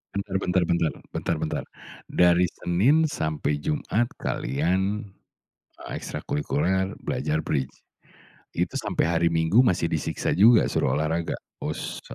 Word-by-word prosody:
Bentar 100 -1 -3
bentar 90 -1 +1
bentar 85 -2 +1 0.2
bentar 85 - -1
bentar. 80 - -2 0.4
Dari 90 0 +4
Senin 105 - +2
sampai 75 - -2
Jumat 120 - 0 0.2
kalian, 95 - 0 0.8
eee, - - -7
ekstrakulikuler 95 +6 -1
belajar 80 +1 -1
Bridge. 65 -5 -2 0.8
Itu - - -2
sampai - - 0
hari 85 0 +2
Minggu 80 +9 +4
masih 90 -7 +2
disiksa 80 -2 -1
juga 110 +4 +6
suruh - - 0
olahraga? 80 +2 -1 0.3
Us - - -4
85 Hz, 120 wpm, -25 LUFS, 80-100 Hz, 0.8 s, juga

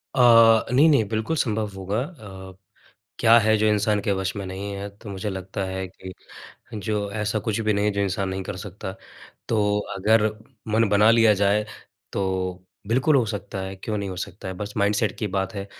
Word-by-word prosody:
अ, 115 -4 +6
नहीं-नहीं, 140 -3 +5
बिल्कुल 110 +8 -1
संभव 110 -4 0
होगा। 95 +2 -3
अ, 100 - -9 0.7
क्या 115 0 +6
है, 110 0 +3
जो 110 +1 +2
इंसान 105 0 +2
के 100 - +1
वश 95 +1 -2
में 100 - -5
नहीं 95 +2 -5
है? 100 +1 -5
तो 100 +1 -13
मुझे 100 +2 -4
लगता 95 0 -5
है 95 0 -4
कि 95 +1 -11 0.6
जो 105 -1 -2
ऐसा 105 +1 -1
कुछ 110 +1 0
भी 110 -1 +1
नहीं 100 0 0
है, - - +3
जो 100 - -2
इंसान 95 0 -1
नहीं 95 0 -3
कर 95 - -6
सकता। 95 -1 -7 0.6
तो 105 -2 +1 0.2
अगर 110 +2 +3 0.5
मन 115 -1 +3
बना 105 +2 +5
लिया 115 -2 +5
जाए, 100 +2 +3 0.5
तो 95 -1 -2 0.2
बिल्कुल 130 +6 +3
हो 125 - +3
सकता 100 -2 -5
है, 95 0 -5
क्यों 105 +3 -4
नहीं 100 -1 -3
हो 95 - -6
सकता 95 +1 -6
है? 95 - -5
बस 105 +2 -6
माइंडसेट 105 +1 +1
की 105 - -1
बात 95 0 -2
है 100 -1 -5
105 Hz, 200 wpm, -24 LUFS, 95-110 Hz, 0.7 s, अ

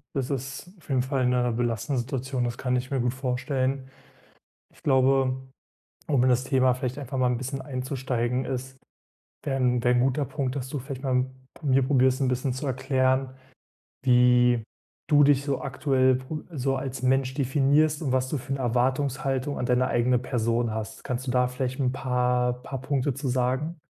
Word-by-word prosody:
Das 135 -1 -1
ist 140 +6 -5
auf 170 - -21
jeden 130 -3 +2
Fall 130 0 0
'ne 125 -1 +2
belastende 120 +2 -1
Situation. 130 0 -2
Das 120 0 -3
kann 125 -1 0
ich 130 +1 -4
mir 135 -3 0
gut 125 +1 0
vorstellen. 130 +1 -2 0.9
Ich - - -22
glaube, 130 -1 +3 0.7
um 135 -5 +3
in 130 - +4
das 125 +1 +3
Thema 130 -2 +3
vielleicht 130 +1 -4
einfach 135 -2 -4
mal 125 - +3
'n 120 - 0
bisschen 130 +2 -4
einzusteigen 130 -2 -2
ist 130 0 -5 0.7
wäre 135 -2 0
'n 125 -2 +1
wäre 125 0 +4
'n 120 - +3
guter 135 +3 +1
Punkt, 135 -1 -3
dass 130 -2 -4
du 145 0 -3
vielleicht 135 +1 -7
mal 125 -1 +2 0.4
mir 135 -3 +3
probierst, 130 -1 +3
'n - - +2
bisschen 125 +1 0
zu 130 +3 -5
erklären, 130 0 0 0.7
wie 125 -1 +5 0.5
du 145 -2 +6
dich 140 -1 +4
so 140 -2 -2
aktuell 130 -1 +2
pro 130 +4 -6
so 135 -2 0
als 130 0 -5
Mensch 130 0 +2
definierst, 145 +3 +2
und 135 -4 -1
was 130 0 +1
du 150 - -1
für 135 +2 -6
'ne 135 - -1
Erwartungshaltung 130 +3 0
an - - -2
deine 125 +1 +2
eigene 125 +1 +2
Person 115 -2 0
hast. 110 -1 -6
Kannst 130 0 -3
du - - -1
da 125 0 +2
vielleicht 130 +1 -3
'n 130 -2 +2
paar 125 -1 +1
paar 135 -2 -5
Punkte 140 -1 0
zu 140 +1 -3
sagen? 130 +6 -1
130 Hz, 185 wpm, -26 LUFS, 125-135 Hz, 0.9 s, du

